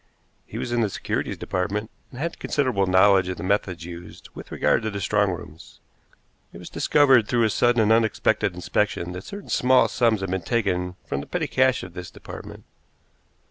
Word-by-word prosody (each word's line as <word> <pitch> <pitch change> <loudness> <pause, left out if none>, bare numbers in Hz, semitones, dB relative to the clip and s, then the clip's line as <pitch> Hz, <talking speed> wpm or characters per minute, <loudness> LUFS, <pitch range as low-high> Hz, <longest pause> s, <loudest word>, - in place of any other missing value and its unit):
He - - -8
was - - -4
in 120 0 +1
the 110 - +1
securities - - -3
department, 100 +4 -3 0.2
and 125 - -12
had 170 +3 -3
considerable 125 -9 0
knowledge 95 0 +5
of 90 - -4
the 85 - -6
methods 95 -3 -1
used 85 0 -10
with - - -11
regard - - +2
to 110 - -2
the 100 -1 -5
strong 100 +1 +1
rooms. 85 -3 -9 0.7
It - - -11
was - - -10
discovered 135 -7 +4
through 120 -2 +2
a 110 - +2
sudden 120 0 +3
and 105 - +2
unexpected 110 -5 +2
inspection 90 0 -1
that 90 +1 -8
certain 200 0 -9
small 130 +1 +4
sums 115 -4 +1
had 95 -1 -3
been 95 -1 -1
taken 90 -5 -1
from 70 -3 -3
the - - -10
petty - - -2
cash 130 0 +2
of 90 -2 -9
this 90 -1 -7
department. - - -10
100 Hz, 190 wpm, -24 LUFS, 90-120 Hz, 0.7 s, knowledge